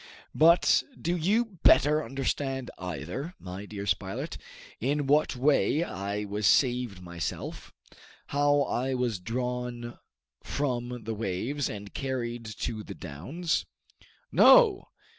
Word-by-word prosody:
But 170 +3 +5 0.2
do 170 +2 0
you 200 +3 0
better 150 +1 +5
understand 135 -1 -2
either, 90 - -5
my 95 +2 -8
dear 100 -1 -6
Spilett, 95 0 -2 0.4
in 145 +4 0
what 145 0 +3
way 145 +4 +2
I 100 - -4
was 105 0 0
saved 120 -8 +2
myself 85 -1 -5 0.6
how 145 0 +3
I 130 0 -1
was 120 -5 -1
drawn 120 +3 -4 0.4
from 125 -4 -3
the 115 - -3
waves, 115 +7 -2
and 100 -1 -8
carried 120 -3 -3
to 110 +1 -4
the 100 - -8
downs? 100 - -3 0.6
No! 450 -6 +6
125 Hz, 115 wpm, -28 LUFS, 100-145 Hz, 0.6 s, No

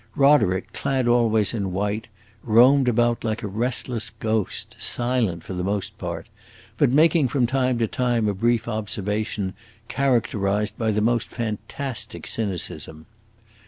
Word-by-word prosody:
Roderick, 135 -10 +3
clad 130 -3 0
always 115 -3 +3
in 100 -5 -2
white, 105 +3 -2 0.4
roamed 125 +4 +5
about 120 0 +2
like 110 -1 -2
a - - -2
restless 115 0 -1
ghost, 110 -1 -3
silent 120 -9 0
for - - -7
the 90 0 -3
most 100 +1 -2
part, - - -5 0.5
but - - +4
making 155 +1 +4
from 125 0 +1
time 130 0 +1
to 115 - +2
time 120 -2 0
a 105 - +1
brief 115 +4 +1
observation, 105 -2 -2 0.4
characterized 105 -5 0
by 110 -1 -1
the 105 0 +1
most 120 +1 +1
fantastic 120 +3 -4
cynicism. 90 -6 -4
110 Hz, 135 wpm, -23 LUFS, 105-125 Hz, 0.5 s, roamed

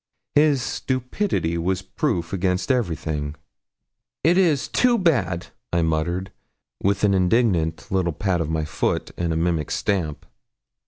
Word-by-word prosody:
His 145 -4 +4
stupidity 125 - -1
was 95 +2 -1
proof 95 - -2
against 95 +5 0
everything. 80 - -1 0.9
'It 165 +4 +5
is 165 -7 +3
too 245 -1 +3
bad!' 115 - +1 0.2
I 85 0 +2
muttered, 85 +4 -1 0.5
with 100 +1 +1
an 100 -1 +4
indignant 90 -4 +2
little 95 -3 +1
pat 90 +1 0
of 80 - -2
my 80 -1 -1
foot 80 - -1
and 85 -1 -1
mimic 80 -3 0
stamp. 85 -7 -1
90 Hz, 125 wpm, -23 LUFS, 80-125 Hz, 0.9 s, It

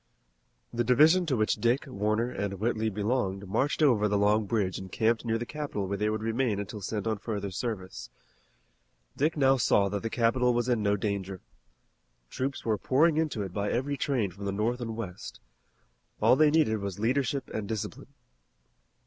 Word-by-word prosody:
The 120 0 0
division 155 +9 +5
to 135 -5 +1
which 110 0 +1
Dick, 120 +3 +1
Warner, 110 -1 -1
and 100 -4 -3
Whitley 110 +2 0
belonged 100 -2 -1
marched 135 +10 0
over 115 -8 +4
the 105 0 +1
Long 105 +1 +3
Bridge 100 -4 -1
and 95 -1 -9
camped 115 0 +1
near 115 -1 0
the 120 - -4
capital 145 -8 -4
where 100 - -2
they 105 0 +1
would 110 0 -2
remain 115 -2 0
until 100 +1 -6
sent 105 +1 -3
on 110 -2 -1
further 100 -3 -4
service. 95 -2 -5 1.1
Dick 155 +3 0
now 135 -1 +4
saw 100 -4 +3
that 100 0 -3
the 115 - -3
capital 120 +2 +2
was 120 0 0
in 120 -3 +1
no 100 0 +2
danger. 100 -2 -3 0.9
Troops 135 +1 -3
were 110 -3 +1
pouring 155 +4 +3
into 155 -10 0
it 95 -2 -7
by 100 +1 -1
every 140 +4 -1
train 130 -8 -1
from 100 +3 -9
the 100 - -1
north 115 +5 -1
and 115 -2 -4
west. 95 -5 -7 0.8
All - - +5
they 155 +2 +5
needed 150 -9 +2
was 100 -2 -5
leadership 135 +5 0
and 110 -2 -4
discipline. 110 -1 -5
110 Hz, 185 wpm, -28 LUFS, 100-130 Hz, 1.1 s, division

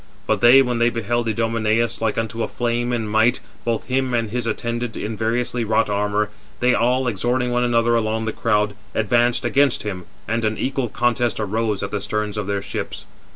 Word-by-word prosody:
But - - 0
they, 125 +3 +8
when 125 -2 -1
they 120 0 +4
beheld 115 0 -1
Idomeneus, 115 +1 0
like 110 -1 0
unto 115 0 -2
a - - 0
flame 120 0 -1
in 115 -3 -1
might, 110 +3 +3 0.2
both 115 -2 -1
him 130 -1 0
and 115 -3 -1
his 120 0 -2
attendant, 120 0 -3
in 110 +1 -4
variously 120 +2 -1
wrought 110 -1 +1
armour, 105 +1 0 0.3
they 125 0 +3
all, 125 +2 +2
exhorting 120 +3 0
one 125 0 +1
another 120 -1 +2
along 110 -1 0
the 110 - -2
crowd, 105 -2 +1 0.2
advanced 120 +3 +2
against 140 -2 +2
him, 95 -4 -5 0.2
and 115 +1 -1
an 110 0 0
equal 130 -2 -1
contest 120 +1 0
arose 105 0 -1
at 100 - -4
the 105 - -2
sterns 105 0 -2
of 105 -2 -3
their 100 -1 -1
ships. - - -5
115 Hz, 195 wpm, -21 LUFS, 105-120 Hz, 0.3 s, they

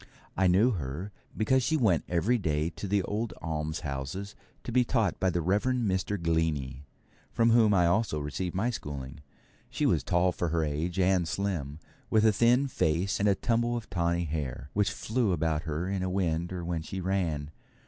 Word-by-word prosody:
I 95 0 +3
knew 100 +8 +4
her, 85 - -4 0.3
because 130 +5 +3
she 160 +6 +1
went 100 - +2
every 105 +8 +2
day 80 -2 0
to 100 - -6
the 100 0 +1
old 110 +4 -3
almshouses 80 +2 -4 0.3
to - - -5
be 125 +1 +4
taught 115 -6 0
by 95 - +2
the 85 -1 -1
Reverend 110 +6 +1
Mr. 95 +1 -1
Glennie, 75 -5 -1 0.4
from 115 0 +3
whom 115 -2 +5
I 90 -2 +4
also 95 -1 +1
received 80 +5 -4
my 110 +6 +1
schooling. 70 - -6 0.5
She - - -1
was - - +3
tall 90 +1 +2
for 85 - -2
her 80 0 0
age, 80 +4 -2
and 90 -2 +3
slim, 90 -6 -2 0.3
with 110 0 +3
a 110 - +5
thin 120 +6 +3
face 90 - 0
and 105 +1 +3
a 100 - +3
tumble 120 +2 0
of 115 - -8
tawny 85 -1 0
hair, 70 -3 -4
which 105 -1 +2
flew 110 -3 0
about 80 -1 0
her 80 +4 -2
in 95 -1 -2
a 95 - -1
wind 85 -2 -1
or 90 -2 -4
when 85 -2 -2
she 95 +4 -6
ran. 85 -6 -1
90 Hz, 190 wpm, -29 LUFS, 80-105 Hz, 0.5 s, whom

